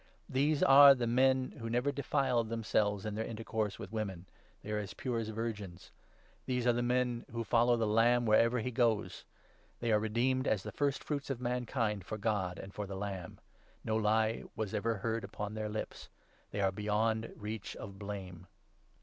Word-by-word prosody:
These 140 +3 +1
are 140 0 +9
the 125 -2 -1
men 130 +2 +3
who 115 0 -4
never 125 +5 +1
defiled 135 -4 0
4 - - -10
themselves 105 -2 0
in 105 - -3
their 110 +2 -2
intercourse 110 -2 -3
with 105 -4 -8
women; 100 -5 -4 0.4
they 105 - -6
are 105 - 0
as 100 -2 -6
pure 125 -3 -2
as 110 -1 -3
virgins. 105 -5 -5 0.6
These 125 -2 0
are 120 - +5
the 120 - 0
men 125 -1 0
who 115 0 -3
follow 120 +1 +3
the 115 - +1
Lamb 120 +3 +3
wherever 115 +2 +4
he 125 - -3
goes. 115 -3 0 0.5
They 120 -1 0
were 105 - +5
redeemed 125 +5 0
as 105 -3 +1
the - - -6
first 140 -2 -1
fruits 145 -2 -3
of 135 -3 -2
mankind 120 -4 -1
for 110 +4 -5
God 100 -4 -1
and 100 - -9
for 105 -1 -4
the 95 0 -5
Lamb. 95 -3 -5 0.2
' - - -32
No 110 - 0
lie 110 +1 +2
was 110 -1 -3
ever 110 +2 0
heard 115 +2 -2
upon 100 +1 -5
5 - - -8
their 110 -1 -3
lips.' 110 +1 -6 0.4
They 100 - -3
are 95 -1 +3
beyond 110 +3 0
reach 105 -1 -6
of 100 -1 -9
blame. 95 -4 -7
110 Hz, 195 wpm, -33 LUFS, 105-120 Hz, 0.6 s, are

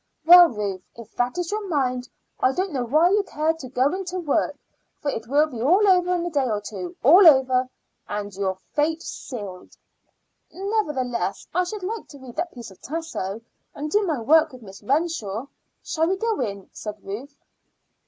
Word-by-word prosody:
Well, 350 +1 +10
Ruth, 205 -5 -4
if 230 -2 -12
that 245 +3 0
is 355 0 -2
your 420 -1 -3
mind, 255 -6 -1 0.3
I 255 - +3
don't 370 +3 -1
know 260 -4 -2
why 310 +9 +4
you 415 +1 +4
care 315 -4 -1
to 285 -6 -10
go 260 +4 +1
in 385 +1 -3
to 365 +1 -4
work, 310 -5 0 0.4
for 285 - -1
it 220 -2 -5
will 290 +4 +4
be 250 -7 -7
all 370 - +4
over 360 -1 +4
in 345 -1 -2
a 350 - -3
day 275 -4 +1
or 210 -2 0
two 190 -4 -7
all 345 +8 +8
over 260 -3 +5 0.4
and 205 -1 -4
your 190 0 -1 0.2
fate 315 +3 0
sealed." 200 -7 -8 0.7
"Nevertheless 300 - -2
I 360 +2 +2
should 400 +2 -6
like 440 +4 -4
to 285 - -13
read 260 -3 -12
that 340 +2 -2
piece 235 -4 -10
of 190 - -18
Tasso, 275 - -4 0.3
and 300 +1 -5
do 415 - +3
my 325 - -1
work 310 +6 +4
with 255 -2 -13
Miss 195 -1 -12
Renshaw. 260 - -1 0.4
Shall 320 0 0
we 380 +2 0
go 450 +1 -1
in?" 200 -2 -4
said 210 -1 -6
Ruth. 260 +9 -7
285 Hz, 195 wpm, -24 LUFS, 230-345 Hz, 0.7 s, Well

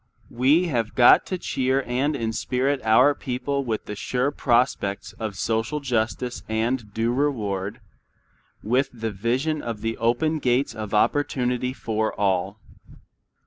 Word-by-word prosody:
We 140 +9 +3
have 120 -9 -2
got 120 -1 +6
to 185 - -2
cheer 130 -4 0
and 135 +5 0
inspirit 130 +3 -1
our 125 +6 +5
people 140 +1 -3
with 115 -4 -3
the 105 - -6
sure 125 +6 -1
prospects 120 -7 0
of 110 -3 -4
social 115 +8 -1
justice 125 -1 -2
and 110 0 -1
due 115 +3 0
reward, 105 -9 -1 0.8
with 130 +5 +1
the 115 -2 -4
vision 130 +10 -1
of 115 -3 -5
the 115 0 -2
open 120 +8 +1
gates 125 -1 +1
of 110 -1 -4
opportunity 125 0 +1
for 110 -4 -2
all. 100 +1 0
120 Hz, 135 wpm, -24 LUFS, 110-135 Hz, 0.8 s, got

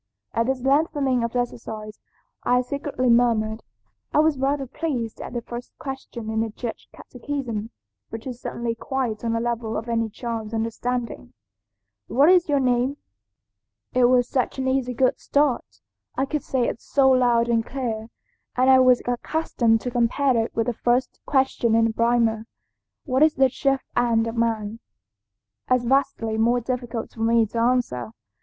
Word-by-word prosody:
"At 230 +1 +1
this 265 -1 -1
lengthening 275 -3 +2
of 235 +1 -3
exercise 220 -3 -4 0.4
I 250 +1 +3
secretly 275 0 -3
murmured. 225 -2 +2 0.5
I - - 0
was 305 -2 +3
rather 275 +1 0
pleased 255 -5 -4
at - - -7
the 240 -1 -3
first 240 +1 -8
question 265 -5 -6
in 220 - -1
the 225 - -1
Church 225 +2 -7
catechism, 245 -4 -5 0.4
which 225 0 -7
is 250 -2 -6
certainly 235 -1 -3
quite 240 -2 -3
on 230 -1 0
the 230 - 0
level 230 -1 -2
of 225 - -5
any 230 -1 0
child's 225 -1 -5
understanding, 230 - -3 0.7
'What 280 +6 +4
is 360 -3 +4
your 285 -1 +3
name?' 255 +2 +1 1.0
It 250 -1 +4
was 245 0 +4
such 255 0 -1
an 265 0 -1
easy 260 -2 0
good 255 +2 +2
start, 285 -3 0 0.4
I 270 - +2
could 300 +1 -2
say 255 -3 0
it - - -4
so 270 -1 +3
loud 240 -2 +3
and 230 -1 +2
clear, 225 -4 -4 0.5
and 255 +1 +4
I 260 - +7
was 255 -1 +5
accustomed 245 -3 0
to 245 - -4
compare 245 +3 +2
it 225 0 -1
with 225 - +1
the 245 - -1
first 245 +3 0
question 265 -4 +2
in 230 0 +4
the 225 - 0
Primer, 230 -1 +1 0.6
'What 260 -2 0
is 310 0 +5
the 265 0 +4
chief 270 0 0
end 235 -2 +2
of 230 0 -4
man?' 225 -2 -1 0.9
as 255 -1 +2
vastly 230 -4 +1
more 240 +2 +3
difficult 240 -1 -4
for 225 - -9
me 230 0 +4
to 230 +2 -4
answer. 230 - 0
245 Hz, 165 wpm, -24 LUFS, 230-265 Hz, 1.0 s, I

